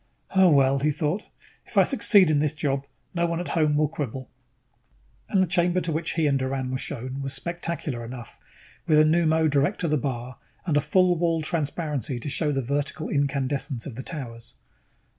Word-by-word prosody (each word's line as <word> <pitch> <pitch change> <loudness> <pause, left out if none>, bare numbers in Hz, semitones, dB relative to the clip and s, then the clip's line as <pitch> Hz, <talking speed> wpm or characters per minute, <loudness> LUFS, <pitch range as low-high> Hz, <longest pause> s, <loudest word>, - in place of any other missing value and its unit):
Oh, 190 -1 +6
well, 135 -2 +4
he 150 +3 +1
thought, 155 +6 -2 0.4
if - - -9
I - - +8
succeed 200 - +5
in 145 - +3
this 150 0 +1
job, 140 -3 -1 0.3
no 170 -1 +1
one 170 0 -2
at 175 - -4
home 155 -2 +2
will 155 0 +3
quibble. 130 -4 -5 1.0
And 190 -2 +3
the - - 0
chamber 175 +1 +2
to 170 -2 -2
which 160 +1 -2
he 165 -2 +1
and 140 -2 +2
Doran 130 0 -2
were 130 - -2
shown 130 0 -5
was 135 0 -3
spectacular 170 -5 -3
enough, 120 0 -9 0.5
with 155 -2 +5
a 155 - +6
pneumo 160 0 +3
direct 145 +7 +1
to 170 - 0
the 150 -1 +2
bar 130 -2 -4 0.3
and 165 -5 0
a 145 - +4
full 185 +3 +3
wall 165 -2 +1
transparency 150 -5 -2
to 120 +5 -5
show 150 +1 0
the 135 -2 -1
vertical 145 +4 -2
incandescence 140 -2 -1
of 140 - -6
the 125 - -6
towers. 125 -7 -7
150 Hz, 195 wpm, -25 LUFS, 135-165 Hz, 1.0 s, I